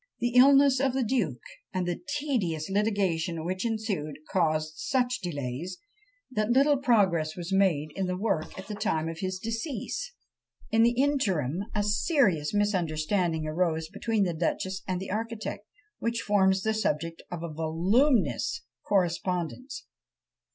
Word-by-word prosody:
"The 240 +1 -1
illness 275 +1 +7
of 265 -1 +1
the 265 -1 +1
duke, 205 - -1 0.3
and 185 -3 -2
the 175 - -2 0.2
tedious 195 - -1
litigation 185 -6 0
which 185 +2 -2
ensued, 215 -10 -2
caused 155 -3 +1
such 250 - 0
delays, 155 +1 -4 0.5
that 215 -3 0
little 280 +4 +4
progress 195 - +2
was 175 +1 -5
made 170 -6 +2
in 190 -1 -1
the 180 0 -2
work 195 -6 -1
at 190 - -7
the 210 - -6
time 185 -7 -1
of 165 0 -5
his 185 0 -2
decease. 230 - -4 0.6
In 225 - +4
the 240 +2 +3
interim 195 - +1
a 210 - +2
serious 205 - +2
misunderstanding 175 -4 0
arose 160 0 0
between 215 +1 0
the 175 -3 0
duchess 185 +3 -2
and 185 -2 -1
the 190 - -6
architect, 215 -1 -4 0.3
which 230 0 -1
forms 190 -2 +3
the 220 - +1
subject 165 -6 -1
of 170 -2 -5
a 165 -2 -5
voluminous 190 - +1 0.2
correspondence. 180 - -1
190 Hz, 145 wpm, -28 LUFS, 165-230 Hz, 0.6 s, illness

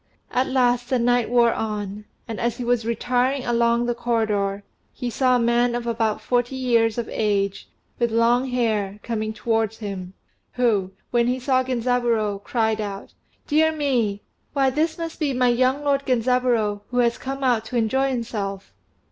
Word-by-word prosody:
At 255 +1 +1
last 245 -2 +1
the 260 - +2
night 245 -1 +2
wore 235 -1 +4
on; 210 -1 -4 0.2
and 225 -2 -5
as 235 -1 -1
he 250 - -4
was 240 -1 +1
retiring 250 +3 0
along 235 0 +2
the 240 - 0
corridor, 215 -4 -1 0.3
he 245 -1 -5
saw 255 +1 +3
a - - +3
man 240 +1 +2
of 240 -1 -3
about 225 -2 0
forty 245 +1 0
years 235 -3 +2
of 235 - -2
age, 200 -2 -1 0.3
with 235 -1 +2
long 235 +3 +2
hair, 215 -5 -1
coming 220 -2 -2
towards 225 -1 -1
him, 195 -3 -6 0.4
who, 220 -7 +1 0.2
when 240 -1 +2
he 250 +1 0
saw 260 0 +2
Genzaburô, 235 -5 0
cried 220 -2 0
out, 200 -1 -6 0.3
"Dear 315 +1 +3
me! 245 -10 0 0.3
why 270 -2 +2
this 315 +4 0
must 330 -1 -5
be 290 -4 0
my 250 0 +3
young 255 +4 +2
lord 280 -1 +1
Genzaburô 240 -4 +1
who 250 - -4
has 235 -1 +2
come 270 +1 -5
out 245 -4 +2
to 245 - -3
enjoy 265 +4 +1
himself." 210 -6 -4
240 Hz, 170 wpm, -23 LUFS, 220-255 Hz, 0.4 s, wore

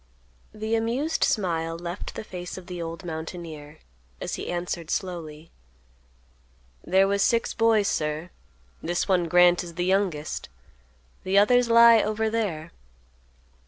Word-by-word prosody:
The 220 +1 -4
amused 240 +8 0
smile 165 -5 0
left 175 +2 -6
the - - -5
face 180 -3 -7
of 185 - -9
the 180 -1 -6
old 165 +2 -6
mountaineer, 160 -2 -7 0.4
as - - -5
he - - -4
answered 175 -2 -4
slowly, 165 -5 -5 1.3
"There 190 +1 +3
was 200 0 +1
six 230 +2 +2
boys, 225 -3 +3
sir; 155 +2 -2 0.5
this 175 +1 -1
one, 180 -3 +2
Grant, 175 +1 +5
is 170 -1 -10
the 175 0 -1
youngest. 185 -5 -1 0.7
The 190 +1 +1
others 245 +4 +4
lie 230 -1 +7
over 215 +1 -1
there." 175 -8 -2
180 Hz, 130 wpm, -25 LUFS, 165-215 Hz, 1.3 s, lie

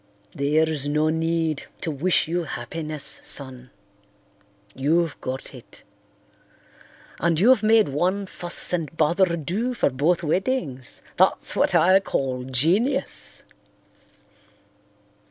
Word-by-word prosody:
"There's 150 0 0
no 150 +2 +1
need 160 -1 -1
to 165 - -2
wish 155 +5 +1
you 170 +1 -1
happiness, 155 +3 -3
son; 130 -2 -4 1.0
you've 160 +4 0
got 130 +2 -5
it. 125 -3 -13 1.4
And 165 -1 +1
you've 230 +3 +5
made 220 -2 +4
one 185 +8 0
fuss 175 -1 -2
and 160 -2 -3
bother 170 +2 +2
do 210 - -2
for 145 - +1
both 155 +7 +1
weddings, 160 - -2
that's - - +2
what - - +2
I 185 +2 +6
call 130 -8 -2
genius. 165 - 0
160 Hz, 105 wpm, -24 LUFS, 140-180 Hz, 1.4 s, I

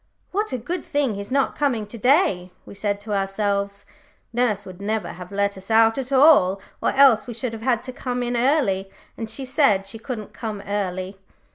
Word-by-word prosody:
"What 420 +3 -1
a - - -1
good 335 +9 -4
thing 285 -5 0
he's 200 0 -6
not 275 +1 +1
coming 250 -7 0
to 210 - -10
day," 230 - +3
we - - -11
said 200 0 -2
to 210 0 -5
ourselves. 200 0 -1 0.5
"Nurse 220 -4 0
would 185 0 -10
never 215 +1 -2
have 180 +1 -9
let 200 -1 -1
us 190 - -11
out 225 +2 +4
at 265 0 -5
all, 260 - +6 0.2
or - - +2
else 265 -6 +5
we 235 -2 -6
would 245 -3 -1
have 225 - -7
had 240 -1 +1
to 255 0 -7
come 250 -1 -3
in 245 0 -2
early, 235 -7 +1 0.3
and 225 -1 -5
she 265 +4 -4
said 255 -7 +3
she 210 +3 -8
couldn't 225 -3 -6
come 220 -3 -5
early. 190 -1 -3
220 Hz, 205 wpm, -23 LUFS, 200-255 Hz, 0.5 s, all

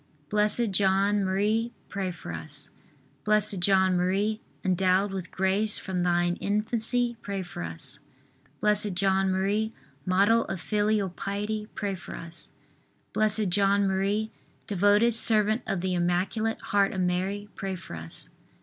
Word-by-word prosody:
Blessed 210 +2 +2
John 195 +1 +2
Marie, 210 +5 0
pray 195 -2 -3
for 175 - -8
us. 80 -1 -6 0.5
B. 215 0 +4
J. 200 -2 0
M., 190 +3 +2 0.3
endowed 185 +2 +2
with 185 -2 -5
grace 195 +3 +1
from 185 -2 -3
thine 175 0 +1
infancy, 230 +3 0
pray 200 -2 -4
for 180 0 -8
us. 150 -5 -6 0.6
B. 210 0 +5 0.2
J. 185 +1 -1
M., 195 +3 +1 0.3
model 200 +5 +4
of 190 - -4
filial 210 +1 +1
piety, 210 +3 -3
pray 200 -2 -2
for 185 - -8
us. 170 0 -7 0.6
B. 215 0 +2
J. 195 +2 +1
M., 200 +2 +2 0.4
devoted 205 +4 +3
servant 215 0 +5
of 190 - -1
the 185 0 -1
Immaculate 180 +6 0
Heart 200 -1 +1
of 190 - -1
Mary, 185 +3 -1
pray 195 -1 -4
for 170 - -9
us. 80 0 -5
195 Hz, 135 wpm, -27 LUFS, 185-210 Hz, 0.6 s, B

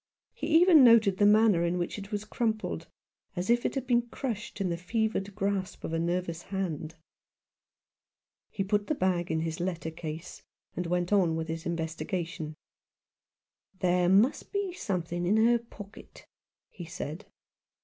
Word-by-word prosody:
He - - -5
even 340 -5 +7
noted 225 -5 +6
the 205 - +6
manner 210 -4 +5
in 170 +1 0
which 175 +4 -3
it 200 0 -10
was 205 0 -3
crumpled, 220 0 -2 0.5
as 180 +5 0
if 240 0 +3
it - - -6
had 270 -2 -2
been 240 -1 +3
crushed 225 -5 -5
in 190 -2 0
the - - 0
fevered 200 +2 -2
grasp 195 -2 -2
of 165 - -4
a 165 - 0
nervous 170 0 -2
hand. 170 -5 -4 1.5
He 195 - -2
put 205 +1 0
the 305 - 0
bag 180 -5 0
in 160 0 0
his 160 0 -3
letter 170 -2 -3
case, 160 +1 -7 0.3
and 180 - -3
went 180 +2 0
on 180 -5 +3
with 160 0 -4
his 165 +1 -4
investiga 170 +2 -2
tion. 160 -3 -7 1.2
"There 180 -1 +2
may 205 +8 +6 0.2
be 400 -3 -2
something 175 - -3
in 210 +4 +3
her 235 +2 +4
pocket," 215 -3 -13 0.5
he 175 - -9
said. 165 +2 -6
185 Hz, 160 wpm, -29 LUFS, 170-215 Hz, 1.5 s, even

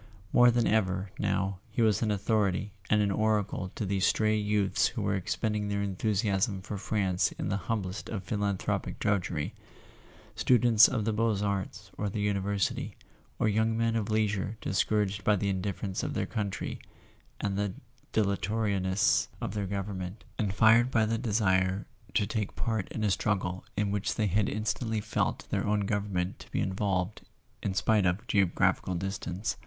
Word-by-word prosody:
More 125 0 +7
than 120 -1 +2
ever, 95 -3 +1
now, 95 -1 0
he 110 +2 0
was 110 -4 +3
an 110 - +1
au¬ 105 - +1
thority 105 -1 0 0.2
and 105 0 +4
an 100 - +1
oracle 105 -3 0
to 105 - -2
these 95 -1 0
stray 110 0 +2
youths 105 -2 +2
who 115 -3 -4
were 100 0 +1
expending 105 +2 -1
their 100 0 -1
enthusiasm 100 -1 0
for 100 +1 -5
France 95 -3 0
in - - -4
the 100 - 0
humblest 100 -4 -2
of 100 -4 -4
philanthropic 100 0 -2
drudgery: 100 -4 -1 0.8
students 115 0 +6
of 110 -4 -1
the 110 - +1
Beaux 110 -2 +1
Arts 100 -2 -3
or 105 - 0
the 105 - -4
University, 100 -1 -1 0.4
or - - +1
young 110 +1 +2
men 115 0 +1
of 110 -2 -1
leisure 105 -1 0
discouraged 100 +1 0
by 105 - +4
the 100 +1 -1
indifference 95 0 -2
of - - -3
their - - 0
country 100 -2 -3 0.6
and 100 -1 -1
the 100 -1 -1 0.4
dilatori¬ 100 0 0
ness 95 +3 +2
of 115 -5 -4
their 100 -2 -2
government, 95 0 -4 0.2
and 105 -3 +1
fired 115 +4 +6
by 115 -4 +3
the 115 +1 -1
desire 95 -4 +1 0.3
to 105 - +3
take 105 0 -3
part 110 -5 -1
in 110 - -3
a 105 - +2
struggle 95 -2 -1
in 105 -1 +1
which 100 0 -1
they 110 - +1
had 100 +1 +2
instantly 110 +1 -1
felt 110 +1 -1
their - - 0
own 105 -1 +1
country 100 -3 -1
to - - -12
be - - -1
involved 95 0 -1 0.4
in 95 -2 -2
spite 105 -1 +3
of 90 +7 -1
geograph¬ 100 -6 +2
ical 90 -2 -3
distance. 95 +2 -3
105 Hz, 170 wpm, -29 LUFS, 95-110 Hz, 0.8 s, More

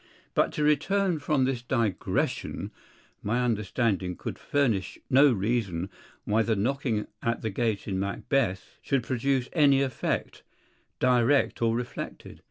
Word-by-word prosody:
But - - +2
to 150 - -1
return 170 +4 +2
from 145 -3 +1
this 130 -2 -1
digression, 115 -6 -1 0.5
my 120 +4 0
understanding 105 -4 0
could - - -6
furnish 120 -10 0
no 135 +2 +7
reason 100 -4 -1 0.3
why 110 +2 +2
the 110 0 +1
knocking 115 0 0 0.2
at 115 +1 -1
the 110 - -1
gate 110 0 -1
in 95 -2 -1
Macbeth 100 +1 -1
should 135 -3 0
produce 130 +1 0
any 140 -4 +5
effect, 130 -3 -2 0.6
direct 125 +2 +3
or 115 -1 +2
reflected. 120 0 -6
120 Hz, 130 wpm, -27 LUFS, 105-135 Hz, 0.6 s, no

